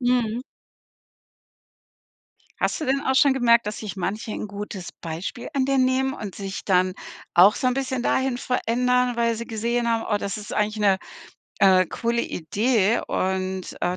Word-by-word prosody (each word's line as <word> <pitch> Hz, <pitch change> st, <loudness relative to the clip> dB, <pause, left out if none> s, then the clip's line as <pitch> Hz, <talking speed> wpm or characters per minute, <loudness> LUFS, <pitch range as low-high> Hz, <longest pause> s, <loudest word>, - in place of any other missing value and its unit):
Mhm. 245 Hz, -2 st, +1 dB, 2.2 s
Hast -, -, 0 dB
du 310 Hz, -, -3 dB
denn 270 Hz, +1 st, +1 dB
auch 265 Hz, -, 0 dB
schon 275 Hz, 0 st, +5 dB
gemerkt, 235 Hz, -3 st, +4 dB
dass 210 Hz, -, -4 dB
sich 210 Hz, -2 st, -6 dB
manche 210 Hz, +4 st, -3 dB
'n 210 Hz, -, -4 dB
gutes 200 Hz, -2 st, -7 dB
Beispiel 170 Hz, +8 st, -5 dB
an 270 Hz, -2 st, +1 dB
dir 275 Hz, 0 st, +1 dB
nehmen 260 Hz, +1 st, +2 dB
und 205 Hz, -6 st, -7 dB
sich 195 Hz, -1 st, -6 dB
dann 185 Hz, -1 st, +2 dB, 0.4 s
auch 190 Hz, +4 st, +7 dB
so 255 Hz, -, 0 dB
'n 250 Hz, -, +2 dB
bisschen 260 Hz, -2 st, -2 dB
dahin 260 Hz, -1 st, +1 dB
verändern, 250 Hz, 0 st, +1 dB
weil 230 Hz, -1 st, +1 dB
sie 235 Hz, +1 st, -5 dB
gesehen 235 Hz, +2 st, -1 dB
haben: 225 Hz, -1 st, 0 dB
„Oh -, -, +3 dB
das 200 Hz, 0 st, -4 dB
ist 210 Hz, -, -7 dB
eigentlich 210 Hz, 0 st, 0 dB
'ne, 200 Hz, -3 st, +3 dB, 0.6 s
äh, 185 Hz, -2 st, +6 dB
coole 235 Hz, +5 st, -1 dB
Idee, 215 Hz, +5 st, +1 dB
und, 190 Hz, 0 st, -2 dB
äh, 180 Hz, +1 st, 0 dB
230 Hz, 170 wpm, -24 LUFS, 195-250 Hz, 2.2 s, auch